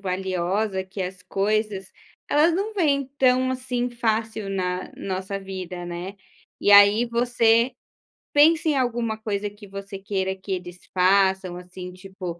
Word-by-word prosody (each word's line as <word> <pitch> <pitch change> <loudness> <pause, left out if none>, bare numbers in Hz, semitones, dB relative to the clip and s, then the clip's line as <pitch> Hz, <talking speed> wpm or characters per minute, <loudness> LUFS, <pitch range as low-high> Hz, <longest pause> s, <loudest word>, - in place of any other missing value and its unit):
valiosa 190 +1 -1
que 190 +1 -8
as 185 0 -5
coisas, 205 -1 -1 0.4
elas 305 +4 +4
não 405 +5 -2
vêm 280 -7 +1
tão 255 -1 +3
assim 250 -1 -2
fácil 220 -3 -2
na 180 -1 -2
nossa 190 +1 -4
vida, 185 -2 -6
né, 175 +3 -6 0.4
e 205 - +4
aí 205 +3 +8
você 235 0 +3 0.6
pensa 315 +2 +5
em 300 - +2
alguma 240 -3 -1
coisa 205 -2 -3
que 205 0 -14
você 195 0 -8
queira 190 -1 -2
que 190 +1 -9
eles 180 -1 -6
façam, 190 -1 +3
assim, 180 0 -9
tipo, 185 -2 -8
200 Hz, 140 wpm, -24 LUFS, 185-235 Hz, 0.6 s, aí